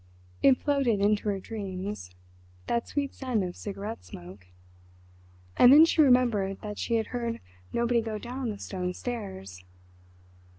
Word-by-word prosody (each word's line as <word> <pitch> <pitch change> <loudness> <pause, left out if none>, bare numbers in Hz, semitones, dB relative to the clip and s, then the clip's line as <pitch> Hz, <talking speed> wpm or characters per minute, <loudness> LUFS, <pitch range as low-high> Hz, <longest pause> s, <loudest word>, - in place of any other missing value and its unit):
It 265 -2 +6
floated 275 -7 +1
into 210 +1 +2
her 200 -1 -1
dreams—that 180 - -6
sweet 280 -2 -2
scent 250 -6 -1
of 180 -1 -5
cigarette 205 +2 -6
smoke. 90 +2 -12 1.1
And 245 - +8
then 305 +3 +9
she 330 - +3
remembered 240 -8 +3
that 210 -1 -6
she 235 - 0
had 225 -1 +1
heard 235 -1 -2 0.3
nobody 235 0 +1
go 220 -1 -4
down 250 +2 -5
the 210 - -4
stone 180 -2 -4
stairs. 95 - -6
210 Hz, 135 wpm, -28 LUFS, 180-245 Hz, 1.1 s, then